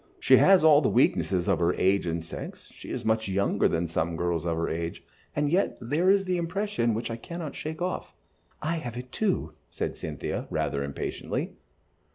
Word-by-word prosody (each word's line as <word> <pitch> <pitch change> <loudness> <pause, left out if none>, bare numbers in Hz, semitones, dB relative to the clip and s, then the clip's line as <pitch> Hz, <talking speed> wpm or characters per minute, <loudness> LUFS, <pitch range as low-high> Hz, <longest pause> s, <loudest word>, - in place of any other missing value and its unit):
She - - +6
has 190 -4 +6
all 155 -2 +7
the 135 - +2
weaknesses 90 - +2
of 95 -4 +2
her 85 +1 +2
age 95 -1 +2
and 85 0 -2
sex, 80 - -8
she - - -11
is - - -4
much 110 -1 +1
younger 100 +1 +2
than 85 +1 0
some 85 0 -1
girls 85 0 -1
of 85 -1 0
her 85 - 0
age, 85 +1 -4 0.3
and 145 0 +1
yet 190 +4 +1
there 150 +10 +1
is 195 0 +4
the 180 -1 0
impression 175 - 0
which 115 +1 -3
I 115 - -3
cannot 170 +3 -6
shake 160 +2 -5
off." 185 - -4 0.5
"I 165 +2 0
have 120 -7 -5
it, 125 0 -7
too," 185 - 0 0.2
said - - -3
Cynthia, - - -4
rather 70 0 -1
impatiently. 70 0 -4
115 Hz, 195 wpm, -27 LUFS, -, 0.5 s, all